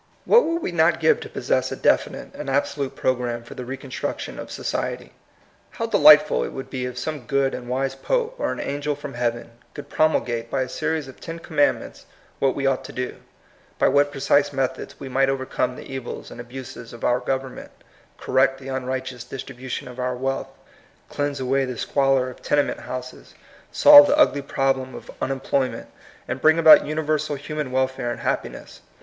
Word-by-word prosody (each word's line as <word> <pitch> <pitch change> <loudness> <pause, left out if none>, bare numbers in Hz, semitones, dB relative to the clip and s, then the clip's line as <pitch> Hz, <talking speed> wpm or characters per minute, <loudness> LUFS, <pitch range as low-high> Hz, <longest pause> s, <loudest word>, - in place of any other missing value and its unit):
What 475 +1 +6
would 335 0 -1
we - - -2
not 165 0 +3
give 160 - +3
to - - -8
possess - - -1
a - - -2
definite - - 0
and 150 - -6
absolute 140 0 -1
program 120 -2 -1
for 115 - -11
the 125 - -7
re 135 +2 -5
construction 135 -1 -5
of - - -7
society? - - -4 0.6
How - - -4
delightful 60 - +6
it - - -5
would 135 - -7
be 125 -2 -3
if 125 -1 -8
some 140 0 -5
good 140 -1 +1
and 120 - -6
wise 135 +1 -1
pope, 480 - -1
or - - 0
an - - -5
angel 145 +1 -2
from 145 -1 -8
heaven, 120 -1 -2 0.2
could 145 - -9
promulgate 120 -7 +1
by 135 +1 0
a 130 - -7
series 160 -3 -2
of 130 - -12
^^ten 165 0 -7
commandments" 155 -3 -1 0.3
what 135 -1 +2
we 140 - -2
ought 135 -1 +1
to - - -8
do, 125 0 -4 0.6
by - - +3
what 145 +1 +3
precise 140 +1 +2
methods 135 -2 -3
we 135 - -7
might 135 +1 +2
overcome 130 -1 -1
the - - -10
evils 130 -2 -6
and 120 - -8
abuses 120 -1 -9
of 120 - -11
our 120 +1 +2
government, 130 0 -4 0.5
correct 135 +1 +2
the 135 0 -9
unright 130 0 -2
eous 125 -2 -9
distribution 130 -1 -6
of 125 0 -10
our 125 0 -1
wealth, 135 +2 -2 0.6
cleanse 145 -1 -2
away 135 +1 +1
the 125 -2 -4
squalor 135 -1 +1
of 125 - -10
tenement 145 -1 +1
houses, 125 0 -8 0.4
solve 290 0 +9
the 290 - +2
ugly 300 - +4
problem 135 -1 -1
of - - -10
" - - -29
unemployment," 135 0 -1 0.4
and 130 - -4
bring 160 +1 +5
about 160 -3 +8
universal 155 -1 -1
human 150 -1 -5
welfare 130 -1 -1
and 120 - -5
happiness. - - -4
135 Hz, 190 wpm, -23 LUFS, 125-145 Hz, 0.6 s, solve